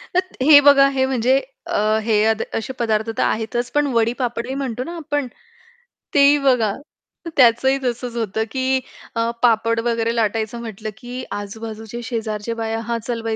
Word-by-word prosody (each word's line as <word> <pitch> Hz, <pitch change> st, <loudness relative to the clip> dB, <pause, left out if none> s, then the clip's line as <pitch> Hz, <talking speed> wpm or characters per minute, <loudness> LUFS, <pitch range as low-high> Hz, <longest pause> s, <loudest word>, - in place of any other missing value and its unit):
तर -, -, +6 dB, 0.2 s
हे 290 Hz, +1 st, +8 dB
बघा 275 Hz, -1 st, +7 dB
हे 265 Hz, -1 st, +1 dB
म्हणजे 260 Hz, +1 st, +2 dB, 0.3 s
अ, 215 Hz, +1 st, +1 dB
हे 215 Hz, -2 st, +2 dB
अद 220 Hz, 0 st, +1 dB
असे 225 Hz, +4 st, -3 dB
पदार्थ 220 Hz, -1 st, 0 dB
तर -, -, +1 dB
आहेतच 240 Hz, +2 st, -1 dB
पण 295 Hz, -1 st, +1 dB
वडी-पापडी 235 Hz, +2 st, -1 dB
म्हणतो 255 Hz, -3 st, -3 dB
ना 340 Hz, +6 st, -7 dB
आपण 290 Hz, -4 st, -2 dB, 0.9 s
ते 285 Hz, -, +3 dB
ही 295 Hz, -, +5 dB
बघा. 235 Hz, -6 st, +3 dB, 0.6 s
त्याचंही 260 Hz, +2 st, +5 dB
तसंच 245 Hz, -1 st, -3 dB
होतं 220 Hz, -1 st, -1 dB
की 265 Hz, 0 st, +1 dB, 0.4 s
अ, 230 Hz, 0 st, +1 dB
पापड 230 Hz, 0 st, +3 dB
वगैरे 230 Hz, 0 st, 0 dB
लाटायचं 225 Hz, +1 st, -1 dB
म्हटलं 220 Hz, -1 st, -6 dB
की 250 Hz, +2 st, -7 dB
आजूबाजूच्या 220 Hz, +2 st, -6 dB
शेजारच्या 225 Hz, -2 st, -3 dB
बाया, 225 Hz, 0 st, -2 dB
"हां, 235 Hz, +1 st, -2 dB
चल 235 Hz, -2 st, -2 dB
बाई 225 Hz, -1 st, -2 dB
235 Hz, 160 wpm, -20 LUFS, 220-260 Hz, 0.9 s, हे